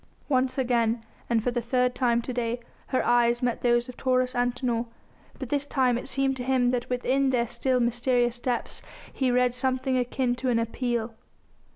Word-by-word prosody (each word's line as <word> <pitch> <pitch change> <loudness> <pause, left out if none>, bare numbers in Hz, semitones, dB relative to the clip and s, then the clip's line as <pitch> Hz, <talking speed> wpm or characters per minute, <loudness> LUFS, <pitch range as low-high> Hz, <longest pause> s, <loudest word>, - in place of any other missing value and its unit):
Once 260 -2 +1
again, 235 -3 +1 0.2
and 230 -2 +2
for 245 - +1
the 240 0 -1
third 250 +1 +1
time 235 -2 +1
to 255 - -4
day, 240 0 -1 0.3
her 255 - 0
eyes 240 0 +3
met 245 -1 0
those 240 0 +2
of 250 - -9
Taurus 255 -1 +1
Antinor, 245 -1 0 0.5
but 260 - -6
this 285 +1 -1
time 255 -4 +2
it 250 +3 -4
seemed 270 0 +1
to 250 - -4
him 250 -1 +2
that 245 -1 -2
within 260 +2 +1
their 245 -2 +2
still 250 +2 0
mysterious 240 0 +1
depths 245 -1 -2 0.3
he 260 -2 0
read 250 0 +3
something 260 0 0
akin 250 0 0
to 250 +1 -2
an 240 - +2
appeal. 230 0 -2
245 Hz, 185 wpm, -26 LUFS, 240-255 Hz, 0.5 s, eyes